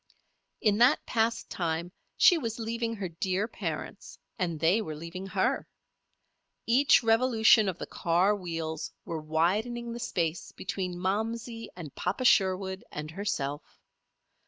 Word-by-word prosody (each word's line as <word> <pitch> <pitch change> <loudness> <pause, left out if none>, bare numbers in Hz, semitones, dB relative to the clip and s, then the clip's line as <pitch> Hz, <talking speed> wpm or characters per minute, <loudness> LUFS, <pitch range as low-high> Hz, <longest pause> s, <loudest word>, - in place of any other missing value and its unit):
In 210 -1 +3
that 245 +5 +5
past 230 0 0
time 170 0 -2 0.3
she 360 - +7
was 230 -5 -3
leaving 230 0 -2
her 200 -3 -4
dear 185 +4 -1
parents - - -6 0.2
and 170 -4 -1
they 170 +8 +3
were 155 -7 -5
leaving 170 +5 -7
her. - - 0 1.0
Each 255 +2 +5
revolution 225 -2 +5
of 180 - -4
the - - -5
car 180 +5 +2
wheels 165 -4 -4
were 165 -2 -4
widening 210 +10 0
the 235 - -6
space 170 -7 -2
between 185 -2 -4
"Momsey" 225 +5 -2
and 160 -6 -8
"Papa 195 +8 -2
Sherwood," 190 -3 +3
and 150 +1 -6
herself. 155 -7 -4
190 Hz, 135 wpm, -29 LUFS, 170-225 Hz, 1.0 s, she